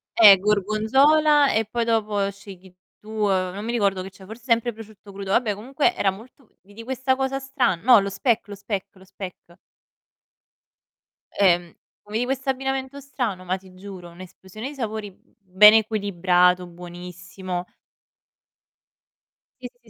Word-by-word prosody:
Eh, 205 -4 +9
gorgonzola 265 +9 +3
e 220 0 +1
poi 230 +2 -2
dopo 210 -3 0
scegli 190 -2 -14 0.3
tu, 215 - -16
uhm, 195 -4 0
non 205 - -7
mi 235 - -3
ricordo 200 -5 0
che 190 - -7
c'era, 190 0 -16
forse 220 +4 -11
sempre 235 -1 +1
prosciutto 215 -2 -14
crudo. 195 0 -7
Vabbè 220 -3 +2
comunque 270 - -1
era 195 - +1
molto 230 +5 -16
vidi 205 +4 -13
questa 260 +1 -1
cosa 265 0 -2
stra 270 -7 0
no 230 +6 +5
lo 200 0 -2
speck, 225 +1 0
lo 205 - -8
speck, 200 -1 -5
lo 190 - -18
speck. 180 -2 -11 1.8
Ehm, 175 -4 +2 0.4
vedi 225 +3 -1
questo 270 +1 -3
abbinamento 270 +1 -3
strano, 245 -9 -4
ma 185 +1 -1
ti 185 -1 -18
giuro 185 -2 -10
un'esplosione 185 +6 -10
di 290 - -11
sapori, 220 -5 -5
mhmm, - - -31
ben 200 +2 +6
equilibrato, 185 -4 +2
buonissimo. 175 +1 -8 2.0
Sì, 250 - -6
sì, 240 -1 -25
210 Hz, 150 wpm, -23 LUFS, 190-240 Hz, 2.0 s, Eh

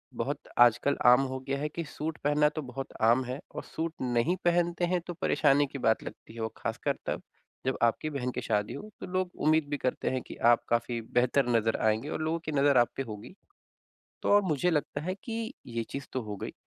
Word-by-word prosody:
बहुत - - -2 0.2
आजकल 120 +4 +5
आम 125 +2 +8
हो 130 - -3
गया 140 0 0
है 150 +1 -1
कि 170 - -2
सूट 155 +1 -5
पहनना 150 +1 +4
तो 155 +1 -5
बहुत 135 0 -6 0.2
आम 120 +4 +5
है 130 +2 -4 0.2
और - - -4
सूट 160 0 -2
नहीं 125 +7 +1
पहनते 175 0 +2
हैं 180 - +2
तो 175 - -3
परेशानी 140 +1 +3
की 135 - -3
बात 110 - +3
लगती 110 - -10
है 115 - -6
और 110 -1 -2
ख़ासकर - - -2
तब - - -2 0.4
जब 130 - 0
आपकी 120 +6 +2
बहन 125 -3 -2
की - - -4
शादी 105 -1 0
हो, 210 +9 -8
तो - - -6
लोग 185 0 -1
उम्मीद 155 0 +2
भी 145 - -1
करते 130 -2 -1
हैं 130 -1 -1
कि - - -8
आप 120 0 +6
काफ़ी 120 0 0
बेहतर 125 +2 +3
नज़र 115 0 +1
आएँगे 110 +7 +1
और - - -3
लोगों 160 +1 0
की 155 - -2
नज़र 140 -1 +4
आप 120 -1 +6
पे 135 - -2
होगी। 110 - -8 0.9
तो - - -1
अब 205 - +2
मुझे 155 +3 +2
लगता 145 -1 -1
है 185 +4 -2
कि 230 +1 -4
ये 115 -1 -3
चीज़ 140 0 -5
तो 130 - -1
हो 105 -2 -5
गई, - - -5
140 Hz, 225 wpm, -29 LUFS, 120-155 Hz, 0.9 s, आम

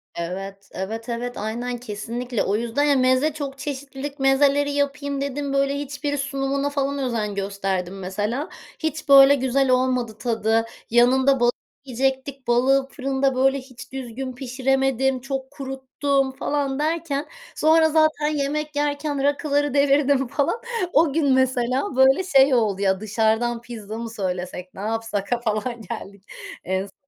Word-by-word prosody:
Evet, 195 +3 -6
evet, 225 +5 -5
evet, 245 +1 -4
aynen, 240 +3 -3
kesinlikle. 235 +1 -4
O 200 - 0
yüzden, 235 +5 0
ya, 290 -1 +4
meze, 260 +3 +3
çok 280 -2 -5
çeşitlilik, 280 0 -6
mezeleri 280 +1 +3
yapayım 285 0 -1
dedim. 280 0 -3
Böyle, 275 0 +1
hiçbiri 285 +1 -3
sunumuna 275 0 -1
falan 280 0 -1
özen 225 -6 -2
gösterdim 195 -1 -3
mesela. 210 - -3 0.3
Hiç 315 -1 -3
böyle 275 0 +9
güzel 265 0 +1
olmadı 255 -3 +1
tadı. 225 -1 +1 0.2
Yanında 260 +3 +4
balığı 240 0 +4 0.3
yiyecektik. 265 +1 -2
Balığı 265 +3 +3
fırında 270 0 -1
böyle 270 +1 +3
hiç 255 -1 -12
düzgün 260 0 -5
pişiremedim, 265 0 0
çok 270 0 -5
kuruttum 270 0 -1
falan 275 0 -2
derken 305 -2 -1 0.3
sonra 315 +1 +4
zaten 310 -1 +2
yemek 300 0 -2
yerken 290 -1 -1
rakıları 285 0 +1
devirdim 280 -1 +3
falan. 285 - -1 0.3
O 315 -4 +4
gün 285 -4 +3
mesela 260 +4 +1
böyle 265 +6 +5
şey 275 -6 +5
oldu, 210 -5 +1
"Ya, 190 -1 +2
dışarıdan 220 +2 0
pizza 220 -3 -8
mı 230 0 -5
söylesek, 185 -3 -4
ne 190 - -9
yapsak?" 225 -1 -2
a 240 - 0
falan, 235 +1 -2
geldik. 200 -3 -8 0.4
En 190 +1 -1
s 195 - -16
265 Hz, 140 wpm, -23 LUFS, 230-280 Hz, 0.4 s, böyle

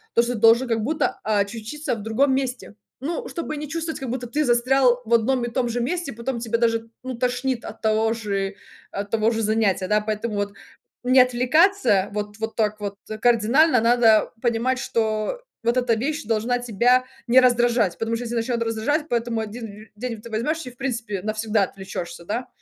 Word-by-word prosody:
То 235 - +5
что 245 +1 -2
должен 230 +4 +5
как 225 -2 0
будто, 295 0 -1
очутиться 220 +8 -2
в 215 - -8
другом 260 +5 +2
месте. 255 -5 -3 0.3
Ну 340 - -3
чтобы 315 -3 -4
не 295 -1 -6
чувствовать, 325 0 -3
как 265 -3 -5
будто 250 0 -3
ты 300 +6 0
застрял 250 +1 +3
в 235 - -1
одном 240 +2 +3
и 240 - -5
том 240 0 0
же 240 +1 -1
месте 315 +1 -2
потом 235 +2 -4
тебя 230 0 -1
даже 230 -1 +1
ну, 260 -1 -4
тошнит 250 0 -1
от - - -9
того 220 0 +2
же 200 -3 -3 0.4
от 200 +1 -5
того 225 0 +2
же 225 - -1
занятия, 210 -3 +1
да. 210 0 +2
Поэтому, 215 +1 -3
вот, 205 0 -2 0.5
не 255 +1 +5
отвлекаться 250 - +3
вот 210 0 -4
вот 220 0 -4
так 215 -1 0
вот 200 -1 -4 0.3
кардинально 245 +4 +4
надо 230 -2 +4
понимать, 240 +2 +1
что 220 - -1 0.2
вот 235 +2 +1
эта 245 -2 +2
вещь 295 +7 -2
должна 230 +3 0
тебя 245 +2 +2 0.2
не 245 +2 +7
раздражать, 240 -5 +3
потому 225 0 -1
что 245 - -5
если 235 0 -4
начнёт 230 0 0
раздражать, 230 +8 -1
поэтому 235 -1 -1
1 215 -1 -8
день 230 -1 -5
ты 235 - -10
возьмешь, 305 +9 -1
и 250 - -7
в 245 - -23
принципе 230 -7 -3
навсегда 215 -1 0
отвлечёшься, 175 -3 -6
да. 235 +7 -3
235 Hz, 190 wpm, -23 LUFS, 220-255 Hz, 0.5 s, не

